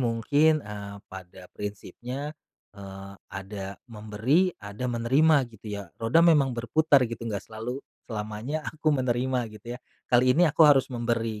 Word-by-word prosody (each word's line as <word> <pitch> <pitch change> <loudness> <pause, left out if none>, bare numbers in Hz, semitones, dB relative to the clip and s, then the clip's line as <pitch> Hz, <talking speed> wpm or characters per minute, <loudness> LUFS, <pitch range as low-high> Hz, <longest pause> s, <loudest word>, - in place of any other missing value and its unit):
mungkin, 145 +6 +2
eee, 100 -1 -7
pada 95 -1 -11
prinsipnya, 125 +8 -6 0.4
eee, 100 -1 -10 0.2
ada 95 0 -7
memberi, 115 - +1
ada 105 +5 -6
menerima 135 +5 +3
gitu 110 0 -14
ya. 100 -1 -4 0.2
Roda 115 +9 +4
memang 140 -7 +4
berputar 140 +3 +3
gitu, 115 -1 -6
nggak 105 -3 -3
selalu 115 +5 -6 0.2
selamanya 110 +7 -4
aku 155 -1 0
menerima 125 -2 0
gitu 120 +3 -8
ya. - - -16 0.3
Kali 125 +1 +5
ini 175 - +6
aku 155 +2 -4
harus 140 -3 +5
memberi 115 -2 -1
115 Hz, 140 wpm, -27 LUFS, 105-140 Hz, 0.4 s, ini